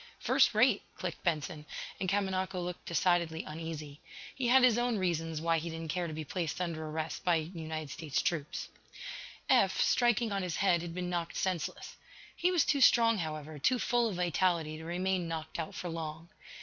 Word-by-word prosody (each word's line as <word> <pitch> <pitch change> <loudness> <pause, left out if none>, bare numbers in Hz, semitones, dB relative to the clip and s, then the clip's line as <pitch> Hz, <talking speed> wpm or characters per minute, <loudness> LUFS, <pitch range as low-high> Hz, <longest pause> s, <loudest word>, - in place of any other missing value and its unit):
"First - - +3
rate," 220 -1 +4 0.2
clicked 180 -3 -5
Benson, 155 -1 -1 0.4
and 185 - -1
Kamanako 190 -1 0
looked 175 0 -5
decidedly 170 -1 +1
uneasy. 155 -2 -6 0.3
He 260 -3 -1
had 260 +2 +6
his 240 -2 +5
own 240 -2 +1
reasons 165 -4 -1
why 165 0 +2
he 170 +2 -5
didn't 165 0 -6
care 175 0 -1
to 160 - -5
be 155 0 -4
placed 170 0 -3
under 170 -3 -2
arrest 155 +1 -4
by 175 -2 +4
United 160 -2 -4
States 155 -3 -2
troops. 155 -4 -2 0.8
Eph, - - +4
striking 240 -2 +3
on 200 -1 0
his 180 -3 -2
head, 180 -4 +3
had 170 -1 -6
been 180 0 -3
knocked 170 -1 -2
senseless. 185 -4 -2 0.4
He 355 - +2
was 350 -5 +3
too 280 - +2
strong, 230 -3 +6
however, 155 -2 -5
too 255 - +3
full 240 0 +2
of 200 - -4
vitality, 175 -2 +1
to 160 - -9
remain 180 +1 -1
knocked 160 0 -5
out 160 - -4
for 180 - -4
long. 165 0 -5
170 Hz, 185 wpm, -32 LUFS, 160-190 Hz, 0.8 s, had